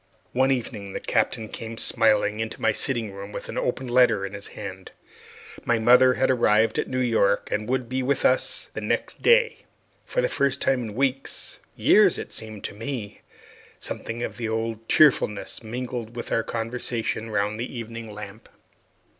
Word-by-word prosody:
One 130 +2 +3
evening 110 -6 -2
the - - -3
Captain 110 - 0
came 115 +1 -7
smiling 105 -2 +2
into 110 0 -4
the - - +2
sitting 120 -6 -1
room 100 +1 -8
with - - -7
an - - -5
open 130 +1 -2
letter 120 -5 +4
in 100 - -7
his 100 0 -7
hand. 95 -1 -7 0.7
My 120 - +2
mother 125 +3 +6
had 130 - +2
arrived 110 -3 +3
at - - -1
New 130 - -3
York, 115 -5 +2
and 105 +2 -2
would 130 -2 0
be 130 +2 -1
with 135 +2 0
us 130 - +1
the - - -4
next - - -2
day. 475 -1 +4 0.5
For - - -1
the - - +3
first 140 - 0
time 130 -2 +2
in 110 -3 -6
weeks 135 +1 -2 0.2
years, - - +5
it - - -7
seemed 110 -2 -5
to - - -4
me 115 -1 -6 0.6
something 115 +1 -4
of - - -5
the 115 -2 -3
old 115 0 -3
cheerfulness 125 -9 +3
mingled 120 0 -5
with 120 - -6
our 115 - +2
conversation 115 -1 -2
round 105 0 -1
the 125 +1 -4
evening 115 -1 -7
lamp. 105 +1 -10
115 Hz, 175 wpm, -25 LUFS, 110-125 Hz, 0.7 s, mother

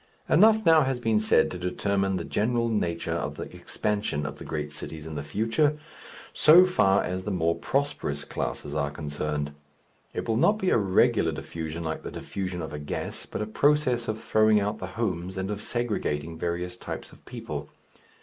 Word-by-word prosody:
Enough 220 +4 +5
now 160 -1 +7
has 135 -3 0
been 110 -3 +2
said 110 - +3
to 90 - -5
determine 95 +2 0
the 90 - -2
general 115 +2 0
nature 85 -7 -1
of - - -3
the - - -5
expansion 105 -8 -2
of 75 - -6
the - - -7
great 75 -1 -4
cities 80 +1 -7
in 80 - -6
the 75 - -3
future, 115 - +1 0.6
so 170 +4 +8
far 100 - +3
as 90 +1 -3
the 105 - -3
more 85 -4 +1
prosperous 110 - -2
classes 70 - -4
are 70 -1 0
concerned. 75 0 -3 0.6
It - - -3
will 110 -1 +1
not 205 - +4
be 190 -3 0
a - - +5
regular 95 -2 +3
diffusion 80 0 -5
like 80 -1 -3
the - - -6
diffusion 90 -3 -4
of 80 - -6
a 75 - -4
gas, 75 - -5
but - - -3
a - - -2
process 125 0 +2
of 110 0 -2
throwing 110 -1 +4
out 105 +2 -2
the - - -4
"homes," 95 -4 -2
and 95 +2 -2
of 105 0 -4
segregating 85 -11 -2
various 90 +2 -3
types - - -7
of - - -18
people. - - -6
95 Hz, 190 wpm, -27 LUFS, 80-115 Hz, 0.6 s, so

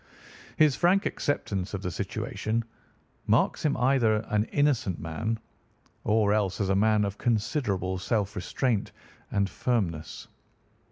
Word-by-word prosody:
His 150 -4 +5
frank 190 +3 +3
acceptance 100 -9 -2
of 95 - -5
the 90 - -2
situation 110 +6 -2 0.6
marks - - +2
him 145 -2 +1
as - - -1
either 115 -5 +3
an 105 0 +2
innocent 140 - +1
man, 110 +8 -2 0.7
or 105 -1 +3
else 100 -3 0
as 100 -2 0
a 95 - +3
man 105 +1 +3
of 100 0 -5
considerable 105 - 0
self 105 +1 -1
restraint 105 +4 -1 0.4
and 100 -1 +1
firmness. 95 -9 -2
105 Hz, 130 wpm, -28 LUFS, 95-120 Hz, 0.7 s, His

